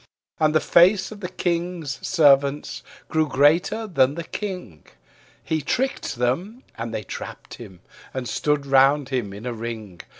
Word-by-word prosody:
And 155 0 +2
the - - +6
face 185 +6 +4
of 210 - -9
the 180 -3 -5
King's 175 -5 -2
Servants 145 -4 +3 0.3
grew 160 -1 +1
greater 165 - +2
than 140 -8 +2
the 170 - -4
King: 180 - -6 0.6
He 160 -1 -1
tricked 265 - -2
them, 170 - -2
and 115 0 -5
they 110 - -4
trapped - - -8
him, 95 -7 -11 0.3
and 130 -2 -4
stood 150 +1 0
round 135 +1 +4
him 125 -7 -2
in 100 +4 -9
a 125 - -2
ring. 110 -6 -7
145 Hz, 155 wpm, -23 LUFS, 125-175 Hz, 0.6 s, the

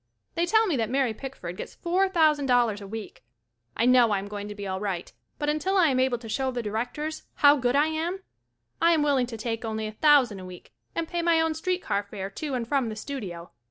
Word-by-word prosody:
They 340 +1 0
tell 440 +3 +4
me 355 -8 0
that 225 -2 -1
Mary 260 -3 +1
Pickford 215 -8 -7
gets - - -7
four 370 +3 +1
thousand 310 -6 +3
dollars 240 -5 +2
a 200 - -8
week. 220 -6 -8 0.5
I 230 - +2
know 250 -1 +6
1 210 -2 +1
am 195 +1 -5
going 205 0 -6
to 210 - -7
be 205 -1 -6
alright, 190 -2 -3 0.2
but 295 - -3
until 310 +6 +1
I 345 -5 +5
am 260 -1 +1
able 255 -1 +2
to 230 -1 -10
show 265 +4 -1
the 245 -2 -3
Directors 245 +9 -3
how 285 0 +6
good 250 0 +1
I 290 +2 +5
am, 330 +4 -2 0.6
I 335 +1 +5
am 310 -2 +2
willing 275 -4 +2
to 230 -2 -7
take 225 +1 -3
only 220 -1 -3
a 215 - -4
thousand 255 -4 +4
a 185 - -8
week 180 -1 -12 0.2
and 335 -1 -1
pay 345 0 -2
my 335 -1 +3
own 320 0 +1
street 360 +3 -2
car 200 - 0
fare 200 -1 -7
to 285 +5 -4
and 235 -2 -3
from 265 -3 +1
the 215 - -5
studio. 200 -9 -6
255 Hz, 240 wpm, -26 LUFS, 215-310 Hz, 0.6 s, know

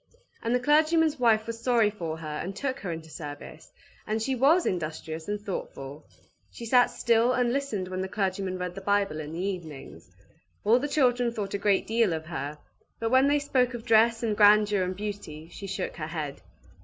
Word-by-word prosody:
And 230 +2 0
the - - +2
clergyman's 310 +2 +3
wife 220 -3 +3
was 230 0 -6
sorry 230 -4 +3
for 165 -6 -5
her 160 -1 -8
and 190 +2 -5
took 275 +3 -3
her 180 - -4
into 160 -1 -7
service; 150 +1 -9 0.4
and 215 +1 0
she 265 +5 -1
was 285 +8 +4
industrious 160 -2 -3
and 210 0 -2
thoughtful. 145 -8 -7 0.4
She 235 - -9
sat 245 +1 +5
still 235 +1 +2
and 245 -1 +1
listened 260 -9 -2
when 185 0 -4
the 190 - -2
clergyman 190 -1 -2
read 180 -1 -4
the 195 - -8
Bible 200 -5 0
in 150 0 -6
the 175 +3 -3
evenings. 155 - -7 0.5
All 225 +4 +4
the 290 - -2
children 250 -4 +2
thought 210 -4 -4
a 200 - -1
great 200 -1 +2
deal 225 -5 +2
of 160 -1 -4
her; 150 -2 -5 0.4
but 225 0 -1
when 260 +1 +5
they 290 +1 +3
spoke 255 -3 +1
of 230 -1 -8
dress, 230 0 +4
and 220 -2 0
grandeur, 210 -1 +5
and 185 0 -2
beauty, 190 -6 -6
she 200 - -8
shook 190 -1 -4
her 155 -2 -4
head. 155 -4 -5
205 Hz, 200 wpm, -27 LUFS, 175-240 Hz, 0.5 s, sat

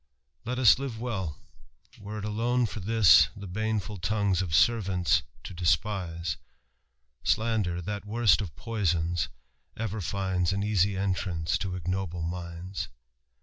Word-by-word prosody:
Let 125 +2 -2
ua 130 - -1 0.2
live 120 -5 -5
well; 95 -11 -3 0.6
were 105 +1 -7
it 105 - -5
atone 120 +4 +1
for 110 - -5
Ihis 105 -1 +6
The 100 - -8
baneful 105 +1 -2
longiies 100 0 +1
of 85 -5 -1
servants 90 -4 +3 0.2
to - - -7
despise: 85 -1 0 0.9
Slander, 105 -6 +1
that 105 +3 -4
worst 110 -6 +4
of 85 -9 -6
poisons, 85 -4 0 0.5
ever 110 -1 -3
finds 95 0 0
An 100 +1 -1
easy 100 -2 +2
entrance 90 -3 -1
lo 95 -2 -3
ignoble 90 -1 -3
minds." 85 +2 -5
95 Hz, 130 wpm, -28 LUFS, 85-110 Hz, 0.9 s, Ihis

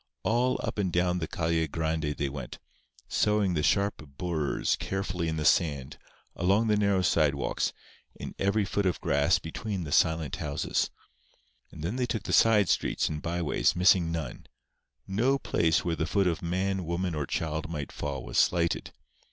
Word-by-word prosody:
All 125 +3 +1
up - - -3
and 95 -3 0
down 90 +1 +1
the 80 - -3
Calle 80 0 0
Grande 80 -1 -2
they 70 - 0
went, 65 -3 -7 0.5
sowing 105 -3 +2
the 75 - 0
sharp 100 +4 +1 0.2
burrs 80 -5 0
carefully 90 -3 -3
in 80 0 -2
the 75 - -2
sand, 70 -4 +1 0.4
along 100 +6 +2
the 105 -1 +3
narrow 100 -2 +2
sidewalks, 75 -5 +1 0.4
in - - -7
every 100 +2 +2
foot 100 -1 0
of 90 - -1
grass - - +2
between 95 +3 -4
the 75 - -6
silent 80 -2 +2
houses. 75 0 -1 0.8
And - - -9
then 100 +9 -2
they 125 -1 0
took 110 -4 -2
the - - -3
side 105 -4 +5
streets - - +1
and 75 -1 -4
by 85 +1 -2
ways, 75 - +1
missing 90 -2 +4
none. 80 -7 -5 0.6
No 120 +8 +1
place 80 - +1
where 85 -1 0
the 80 - -2
foot 100 -1 +2
of 85 -3 0
man, 95 +2 -1
woman 85 +1 -2
or 75 -3 -2
child 80 0 -2
might 75 -4 -5
fall 70 -2 -4
was - - -1
slighted. 85 -1 +1
85 Hz, 175 wpm, -28 LUFS, 80-100 Hz, 0.8 s, side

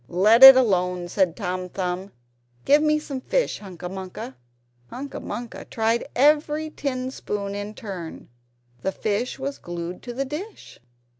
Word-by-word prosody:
"Let 210 +7 +4
it 265 0 +13
alone," 180 -7 +1
said 180 -3 +1
Tom 185 -3 -4
Thumb; 185 +1 -4 0.5
"give 290 +2 +5
me 305 0 +3
some 280 -3 -6
fish, - - 0
Hunca 180 -3 -8
Munca!" 185 -7 -7 0.5
Hunca 275 +3 -7
Munca 235 +2 -6
tried 225 +1 0
every 300 +3 +2
tin 260 -3 -3
spoon 200 -5 -4
in 205 +1 -6
turn; 185 -6 -8 0.5
the 190 - -1
fish 215 +5 -2
was 275 +1 -5
glued 175 +1 -6
to 240 - -7
the 275 +2 -1
dish. 320 +11 -8
215 Hz, 145 wpm, -24 LUFS, 185-270 Hz, 0.5 s, it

